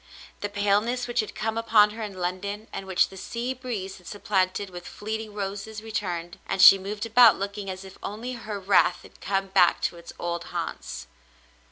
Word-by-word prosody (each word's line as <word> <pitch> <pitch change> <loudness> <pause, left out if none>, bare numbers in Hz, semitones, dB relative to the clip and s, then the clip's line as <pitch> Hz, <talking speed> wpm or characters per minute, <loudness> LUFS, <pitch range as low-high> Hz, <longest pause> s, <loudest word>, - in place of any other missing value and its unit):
The 205 - -3
paleness 205 +5 +1
which 240 0 -1
had 215 - -2
come 220 +1 -1
upon 215 -2 +5
her 225 +2 -8
in 210 -3 -5
London, 200 +4 -3
and 195 - -5
which 190 -1 +3
the 190 - -12
sea 240 +6 -3
breeze 230 -7 -5
had 180 - -17
supplanted 195 -1 -1
with 175 -1 -9
fleeting 215 0 -5
roses, 205 +2 -5
returned, 180 -5 -4
and 195 - -2
she 195 +1 +10
moved 205 +3 -4
about 230 0 +7
looking 200 0 -4
as 190 +1 -6
if 190 - -13
only 225 +5 -5
her 215 -4 -5
wraith 195 +1 +3
had - - -17
come 195 0 -1
back 180 -2 +4
to 175 - -1
its 170 0 -10
old 170 0 -3
haunts. - - -5
205 Hz, 190 wpm, -26 LUFS, 190-220 Hz, -, she